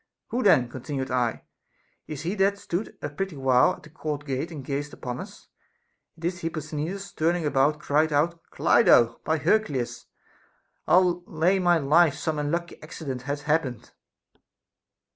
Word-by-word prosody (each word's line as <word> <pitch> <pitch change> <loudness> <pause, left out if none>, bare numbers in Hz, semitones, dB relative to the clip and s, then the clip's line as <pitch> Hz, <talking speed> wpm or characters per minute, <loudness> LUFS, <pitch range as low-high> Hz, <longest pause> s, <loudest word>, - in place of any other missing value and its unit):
Who 245 - -1
then, 130 - +5
continued 130 +2 -5
I, 125 -2 0 0.6
is 150 -1 -6
he 175 +4 -1
that 200 -1 +3
hath - - -16
stood 180 +3 -4
a - - -2
pretty 190 +3 -4
while 130 -2 +4
at - - -13
the 150 - -15
court 150 -2 -4
gate 135 +3 -2
and 150 -6 -8
gazed 145 +2 -3
upon 125 -1 -5
us? - - -11 0.7
At - - -18
this 175 +1 -2
Hipposthenides 160 +4 -4
turning 165 +1 +1
about 145 +1 +2
cried 155 +2 +1
out: 165 +4 +1
Clido, 120 - +4
by 160 - +1
Hercules! 145 - 0 0.8
Ill 180 -1 +4
lay 175 +5 +2
my 175 -2 +4
life 155 +1 +4
some 155 0 -2
unlucky 170 +4 -3
accident 145 -5 -6
hath 145 +1 -3
happened. 150 -6 -1
155 Hz, 155 wpm, -26 LUFS, 140-175 Hz, 0.8 s, then